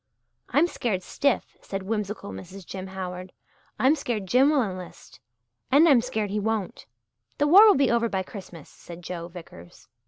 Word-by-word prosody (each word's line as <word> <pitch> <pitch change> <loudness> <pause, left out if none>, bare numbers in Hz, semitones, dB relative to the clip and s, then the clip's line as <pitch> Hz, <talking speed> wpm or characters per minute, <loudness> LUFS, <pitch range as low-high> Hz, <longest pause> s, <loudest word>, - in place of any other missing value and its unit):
"I'm 300 - +4
scared 220 - -2
stiff," 280 +8 -1
said 195 -1 -5
whimsical 210 - -4
Mrs. 175 - -10
Jim 190 +2 -7
Howard. 185 -1 -7 0.4
"I'm 265 +3 +4
scared 240 -9 -3
Jim 255 +9 +4
will 290 -4 +3
enlist 185 -4 -9 0.5
and 295 +5 +6
I'm 270 -7 +6
scared 220 -5 -3
he 210 - -1
won't." 215 - -3 0.5
"The 290 - +2
war 390 +9 +8
will 415 - +6
be 275 -3 +3
over 235 -1 +1
by 190 -2 -2
Christmas," 185 -6 -11
said 175 0 -13
Joe 170 -1 -6
Vickers. 165 - -13
205 Hz, 165 wpm, -25 LUFS, 185-255 Hz, 0.5 s, war